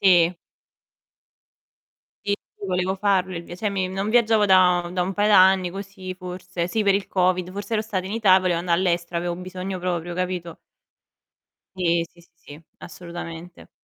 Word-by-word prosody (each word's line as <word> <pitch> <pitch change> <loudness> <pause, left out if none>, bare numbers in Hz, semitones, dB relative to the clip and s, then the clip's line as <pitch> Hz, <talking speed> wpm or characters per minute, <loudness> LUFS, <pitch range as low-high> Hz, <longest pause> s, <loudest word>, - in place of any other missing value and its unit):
Sì. 180 -2 +5 1.9
Sì, 200 0 +1 0.2
sì, 200 - -8
volevo 185 +1 -1
farlo 190 -2 +1
il 170 - -5
via 175 - -9
cioè 210 +1 -1
mi 190 -2 -1
non 195 +3 -2
viaggiavo 225 -2 +4
da 180 -3 +4
da 180 - -1
un 185 +2 -1
paio 205 +1 +2
d'anni 190 -2 +5
così 195 -1 -7
forse, 180 -1 -5
sì 220 +3 0
per 200 -1 +3
il 200 0 -1
Covid, 185 -1 +1
forse 205 +4 -7
ero 215 - +2
stato 200 -4 -3
in 190 - -5
Ita 210 -4 +5
e - - +3
volevo 180 -2 +1
anda' 170 0 -2
all'estero, 170 -1 0
avevo 175 +1 -1
un 170 - -7
bisogno 185 +1 -5
proprio, 175 -1 -3
capito? 180 -2 -3 1.2
Sì. 170 -2 +1
Sì, 175 - -21
sì, 155 -1 -14
assolutamente. 175 0 -9
185 Hz, 175 wpm, -23 LUFS, 175-195 Hz, 1.9 s, Sì